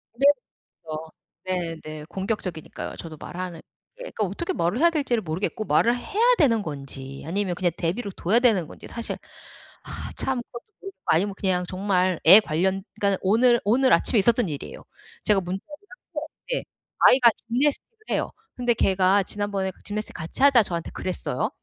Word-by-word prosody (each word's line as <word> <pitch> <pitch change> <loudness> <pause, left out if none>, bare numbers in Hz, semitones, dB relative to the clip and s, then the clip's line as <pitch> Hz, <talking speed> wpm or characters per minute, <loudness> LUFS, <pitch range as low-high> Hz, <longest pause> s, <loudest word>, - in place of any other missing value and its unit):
네. 270 +4 +1 0.6
맞아요. 160 0 -6 0.7
네네. 155 -1 -7
공격적이니까요. 190 -4 -4
저도 160 -2 -8
말하는 175 +1 -6 0.3
그러니까 - - -3
어떻게 275 - -3
말을 175 - 0
해야 340 +3 +6
될지를 280 -8 0
모르겠고 185 +5 -3
말을 235 +3 +3
해야 430 - -1
되는 235 - +4
건지 135 -4 -7
아니면 185 +1 -1
그냥 175 -1 +1
내버려 195 +5 -2
둬야 205 +8 +2
되는 215 -10 +3
건지 - - -12
사실 235 -1 -5 0.7
아 - - -7
참 260 -2 -1
그것도 240 0 -10 0.2
모르겠고 390 0 -10
아니면 195 +5 +2
그냥 180 -2 0
정말 185 -2 0
애 190 +6 +11
관련 190 +2 0
그니까는 200 -1 +1
오늘 235 +5 +4
오늘 255 +5 +4
아침에 230 - +4
있었던 230 +1 +3
일이에요. 145 -2 -7 0.4
제가 205 -2 +3
문자를 185 +2 -4 0.5
했어요. - - -3 0.3
예. - - -1 0.4
아이가 250 -2 +7
gymnastic을 280 - -1
해요. - - 0 0.2
근데 245 -1 +2
걔가 195 -1 +3
지난번에 200 -1 -2
그 - - -24
"gymnastic 210 +1 -4
같이 165 +10 -3
하자." 275 -4 +7
저한테 170 -4 -4
그랬어요. 185 -1 -2
200 Hz, 415 characters per minute, -25 LUFS, 175-240 Hz, 0.7 s, 애